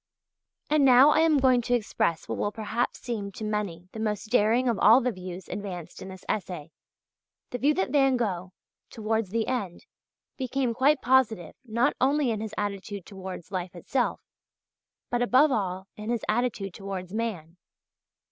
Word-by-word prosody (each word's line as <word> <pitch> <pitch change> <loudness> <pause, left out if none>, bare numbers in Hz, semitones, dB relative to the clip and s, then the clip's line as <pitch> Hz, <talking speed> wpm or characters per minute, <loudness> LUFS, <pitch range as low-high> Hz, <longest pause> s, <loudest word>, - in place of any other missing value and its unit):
And 300 -1 +3
now 265 +2 +7
I - - +3
am 320 -2 +4
going 260 -2 +4
to 245 +1 +1
express 210 -7 -1
what - - -3
will 205 - 0
perhaps 220 +2 -2
seem 210 -5 -4
to 220 - -7
many 205 -5 -3
the 220 - -8
most 215 0 -2
daring 240 +2 +3
of 235 -4 +1
all 225 +5 +7
the 250 -1 0
views 185 -2 -8
advanced 185 -5 -6
in - - -7
this 190 -1 -10
essay, 175 -6 -3 0.8
the 245 - -3
view 295 +4 +3
that 190 +5 0
Van 270 -3 +4
Gogh, 185 -6 -2 0.4
towards 220 -2 -1
the 225 +2 0
end, 205 -9 -3 0.5
became 260 -2 -1
quite 275 +5 +3
positive 240 -8 +2
not 235 0 +1
only 275 -1 +3
in 215 -1 -2
his 215 -1 -5
attitude 200 -1 -4
towards 190 -3 -8
life 180 -1 -4
itself, 245 +9 -1 0.9
but 240 - +1
above 260 +5 +5
all 190 -5 -1
in 210 +1 -7
his 235 -2 -1
attitude 215 -4 -1
towards 195 -2 -6
man. 185 -7 -4
220 Hz, 165 wpm, -27 LUFS, 190-250 Hz, 0.9 s, now